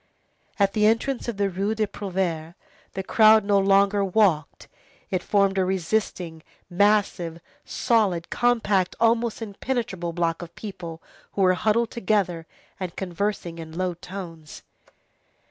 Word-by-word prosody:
At 200 Hz, -1 st, +2 dB
the 210 Hz, -1 st, +3 dB
entrance 235 Hz, +4 st, 0 dB
to 235 Hz, -, -2 dB
the 200 Hz, -1 st, 0 dB
Rue 195 Hz, +3 st, -1 dB
des 215 Hz, -1 st, +1 dB
Prouvaires, 180 Hz, -5 st, -3 dB, 0.4 s
the 190 Hz, -, -4 dB
crowd 215 Hz, +1 st, +5 dB
no 200 Hz, -1 st, +3 dB
longer 200 Hz, +1 st, +3 dB
walked. 185 Hz, -6 st, +1 dB, 0.4 s
It 185 Hz, -, 0 dB
formed 195 Hz, -1 st, +2 dB
a -, -, +3 dB
resisting, 180 Hz, -2 st, -2 dB, 0.3 s
massive, 190 Hz, -3 st, +1 dB, 0.3 s
solid, 205 Hz, -9 st, +1 dB
compact, 210 Hz, -6 st, +1 dB
almost 230 Hz, 0 st, +2 dB
impenetrable 205 Hz, -5 st, -3 dB
block 165 Hz, 0 st, -1 dB
of 170 Hz, 0 st, -10 dB
people 170 Hz, -6 st, -8 dB, 0.3 s
who 195 Hz, -, +1 dB
were 185 Hz, 0 st, +5 dB
huddled 220 Hz, +4 st, +1 dB
together, 190 Hz, -7 st, 0 dB, 0.3 s
and 185 Hz, -3 st, -5 dB
conversing 180 Hz, -2 st, -3 dB
in 160 Hz, 0 st, -8 dB
low 185 Hz, -1 st, 0 dB
tones. 170 Hz, -3 st, -9 dB
195 Hz, 130 wpm, -24 LUFS, 175-215 Hz, 0.4 s, crowd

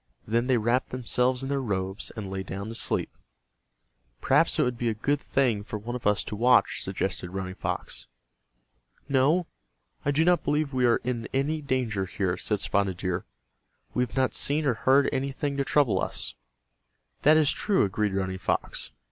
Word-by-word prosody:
Then 115 Hz, +3 st, 0 dB
they 130 Hz, -2 st, +3 dB
wrapped 120 Hz, +4 st, +1 dB
themselves 125 Hz, +1 st, 0 dB
in 135 Hz, -, -4 dB
their 140 Hz, -1 st, 0 dB
robes 95 Hz, -4 st, -3 dB
and 105 Hz, -3 st, -5 dB
lay 95 Hz, 0 st, -3 dB
down 100 Hz, +2 st, -6 dB
to -, -, -6 dB
sleep. -, -, -1 dB, 1.0 s
"Perhaps -, -, +3 dB
it -, -, +4 dB
would 125 Hz, 0 st, 0 dB
be 120 Hz, 0 st, -1 dB
a 110 Hz, -, -2 dB
good 145 Hz, +6 st, 0 dB
thing 120 Hz, -7 st, +1 dB
for 105 Hz, -, -5 dB
one 115 Hz, +4 st, -5 dB
of 120 Hz, -, -2 dB
us 105 Hz, -1 st, +2 dB
to -, -, -5 dB
watch," 125 Hz, +4 st, +3 dB
suggested 90 Hz, -, -3 dB
Running 95 Hz, 0 st, -4 dB
Fox. -, -, -4 dB, 1.0 s
"No, 145 Hz, +6 st, +3 dB, 0.6 s
I 145 Hz, -, 0 dB
do 150 Hz, +3 st, +3 dB
not 180 Hz, 0 st, +3 dB
believe 150 Hz, -1 st, 0 dB
we 125 Hz, -1 st, +3 dB
are 120 Hz, -, +3 dB
in 120 Hz, -2 st, -2 dB
any 150 Hz, +3 st, 0 dB
danger 125 Hz, -8 st, -1 dB
here," 95 Hz, -1 st, -1 dB
said 105 Hz, +3 st, -1 dB
Spotted 100 Hz, -2 st, 0 dB
Deer. 90 Hz, 0 st, -2 dB, 0.7 s
"We 125 Hz, -, +1 dB
have 125 Hz, +1 st, -3 dB
not 130 Hz, -1 st, +2 dB
seen 150 Hz, +2 st, +2 dB
or 130 Hz, -, +3 dB
heard 135 Hz, +4 st, +3 dB
anything 140 Hz, +1 st, -2 dB
to 140 Hz, -, +1 dB
trouble 140 Hz, -3 st, +2 dB
us." -, -, -2 dB, 0.9 s
"That 155 Hz, +2 st, +6 dB
is 155 Hz, -2 st, +4 dB
true," 205 Hz, -3 st, +1 dB
agreed 100 Hz, 0 st, 0 dB
Running 95 Hz, -1 st, -2 dB
Fox. -, -, -2 dB
125 Hz, 180 wpm, -27 LUFS, 100-140 Hz, 1.0 s, That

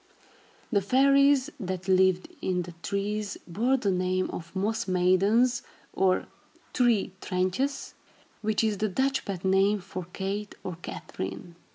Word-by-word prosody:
The 200 Hz, -4 st, +3 dB
fairies 275 Hz, +5 st, +4 dB
that 185 Hz, -2 st, -4 dB
lived 185 Hz, -1 st, +3 dB
in 180 Hz, -1 st, 0 dB
the 175 Hz, -, -9 dB
trees 205 Hz, +1 st, -2 dB
bore 235 Hz, +10 st, +1 dB
the 205 Hz, -6 st, 0 dB
name 185 Hz, 0 st, 0 dB
of 170 Hz, +2 st, -8 dB
Moss 210 Hz, +3 st, -1 dB
Maidens, 195 Hz, +7 st, +3 dB, 0.3 s
or 185 Hz, -1 st, +2 dB, 0.5 s
Tree 235 Hz, -6 st, +2 dB
"Trintjes," 185 Hz, +10 st, -1 dB, 0.5 s
which 215 Hz, 0 st, +1 dB
is 215 Hz, -3 st, 0 dB
the 215 Hz, 0 st, +1 dB
Dutch 270 Hz, +6 st, 0 dB
pet 190 Hz, -2 st, -4 dB
name 195 Hz, +2 st, +3 dB
for 185 Hz, -1 st, -7 dB
Kate, 200 Hz, +2 st, -4 dB
or 180 Hz, -3 st, -5 dB
Katharine. 165 Hz, -, -6 dB
195 Hz, 135 wpm, -28 LUFS, 185-225 Hz, 0.5 s, fairies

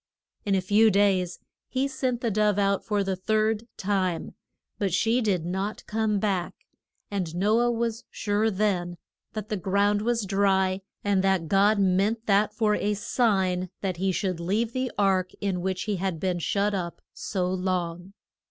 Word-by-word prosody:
In 200 Hz, -1 st, +2 dB
a 190 Hz, -, +2 dB
few 210 Hz, +4 st, +4 dB
days 190 Hz, -4 st, +2 dB, 0.3 s
he 265 Hz, +1 st, 0 dB
sent 260 Hz, -3 st, -2 dB
the 230 Hz, -, 0 dB
dove 210 Hz, 0 st, +2 dB
out 200 Hz, -1 st, +1 dB
for 205 Hz, -2 st, 0 dB
the 190 Hz, -1 st, -1 dB
third 215 Hz, +3 st, 0 dB
time, 185 Hz, -3 st, -1 dB, 0.5 s
but 195 Hz, -2 st, 0 dB
she 225 Hz, +7 st, +2 dB
did 190 Hz, -7 st, 0 dB
not 190 Hz, +4 st, -3 dB
come 215 Hz, -1 st, 0 dB
back; 195 Hz, -4 st, -1 dB, 0.6 s
and 180 Hz, -5 st, -3 dB
No 210 Hz, +5 st, +3 dB
ah 240 Hz, 0 st, +3 dB
was 230 Hz, 0 st, -2 dB
sure 210 Hz, +1 st, 0 dB
then 185 Hz, -4 st, -1 dB, 0.4 s
that 215 Hz, -1 st, -5 dB
the 215 Hz, -, -1 dB
ground 200 Hz, +2 st, +1 dB
was 230 Hz, -1 st, 0 dB
dry, 190 Hz, -1 st, +2 dB, 0.2 s
and 200 Hz, -2 st, +2 dB
that 190 Hz, -4 st, +1 dB
God 200 Hz, +4 st, +4 dB
meant 200 Hz, +4 st, +1 dB
that 205 Hz, +1 st, +3 dB
for 215 Hz, 0 st, +1 dB
a 210 Hz, 0 st, 0 dB
sign 190 Hz, -5 st, +1 dB
that 185 Hz, -3 st, -2 dB
he 190 Hz, +2 st, +1 dB
should 185 Hz, -2 st, -2 dB
leave 215 Hz, +7 st, -1 dB
the 255 Hz, -1 st, -1 dB
ark 190 Hz, -2 st, +2 dB
in 190 Hz, -3 st, -1 dB
which 190 Hz, 0 st, -2 dB
he 210 Hz, -3 st, -2 dB
had 180 Hz, -3 st, -2 dB
been 180 Hz, -1 st, -1 dB
shut 200 Hz, +4 st, 0 dB
up 175 Hz, -3 st, -4 dB
so 185 Hz, -3 st, -2 dB
long. 180 Hz, 0 st, -2 dB
200 Hz, 170 wpm, -26 LUFS, 185-215 Hz, 0.6 s, few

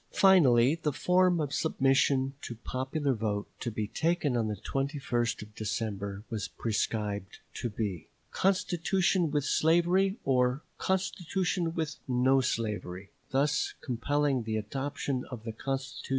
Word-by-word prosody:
Finally 140 Hz, -10 st, +6 dB
the 150 Hz, -, +1 dB
form 180 Hz, +3 st, +3 dB
of 145 Hz, -3 st, -2 dB
submission 135 Hz, 0 st, +2 dB
to 120 Hz, -, -6 dB
popular 135 Hz, +5 st, -2 dB
vote 105 Hz, -3 st, -2 dB
to 120 Hz, -, -2 dB
be 105 Hz, -1 st, -2 dB
taken 160 Hz, 0 st, 0 dB
on 115 Hz, -2 st, +1 dB
the 105 Hz, -, -2 dB
21st 130 Hz, 0 st, -2 dB
of 105 Hz, 0 st, -14 dB
December 100 Hz, -1 st, -3 dB
was 110 Hz, -2 st, -3 dB
prescribed 105 Hz, -3 st, -2 dB, 0.2 s
to 120 Hz, -, -3 dB
be, 105 Hz, -6 st, -4 dB, 0.2 s
"constitution 185 Hz, -1 st, +1 dB
with 145 Hz, -1 st, 0 dB
slavery" 175 Hz, +5 st, +3 dB
or 125 Hz, +1 st, +2 dB, 0.2 s
"constitution 185 Hz, -2 st, -1 dB
with 160 Hz, -2 st, -2 dB
no 130 Hz, +1 st, +3 dB
slavery," 105 Hz, -5 st, -3 dB, 0.2 s
thus 140 Hz, +3 st, +1 dB
compelling 140 Hz, +2 st, 0 dB
the 110 Hz, -1 st, -2 dB
adoption 135 Hz, +3 st, -3 dB
of 120 Hz, -4 st, -7 dB
the 115 Hz, -, -4 dB
constitution 125 Hz, +5 st, -5 dB
in 135 Hz, -, +2 dB
any 135 Hz, 0 st, -9 dB
event. -, -, -10 dB
135 Hz, 140 wpm, -30 LUFS, 110-155 Hz, 0.2 s, Finally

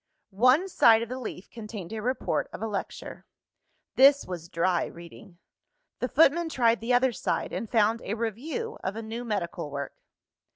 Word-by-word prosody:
One 275 Hz, +9 st, +5 dB
side 230 Hz, -11 st, +5 dB
of 230 Hz, -, -7 dB
the 255 Hz, +1 st, -5 dB
leaf 210 Hz, -6 st, -8 dB
contained 210 Hz, -4 st, -8 dB
a 220 Hz, -, -4 dB
report 255 Hz, +4 st, -1 dB
of -, -, -7 dB
a -, -, -1 dB
lecture. 205 Hz, -2 st, -6 dB, 0.7 s
This 280 Hz, +2 st, +6 dB
was 175 Hz, -2 st, -7 dB
dry 170 Hz, +1 st, +1 dB
reading. 170 Hz, +1 st, -13 dB, 0.6 s
The 250 Hz, -, -2 dB
footman 325 Hz, +3 st, +4 dB
tried 235 Hz, -5 st, +2 dB
the 230 Hz, +2 st, -2 dB
other 250 Hz, 0 st, +3 dB
side, -, -, -2 dB
and 225 Hz, -, -4 dB
found 225 Hz, 0 st, +2 dB
a 210 Hz, -, -3 dB
review 270 Hz, -, -4 dB
of 190 Hz, +2 st, -3 dB
a 225 Hz, -, -5 dB
new 225 Hz, +2 st, -5 dB
medical 180 Hz, -8 st, -3 dB
work. 140 Hz, 0 st, -5 dB
225 Hz, 170 wpm, -27 LUFS, 195-255 Hz, 0.7 s, This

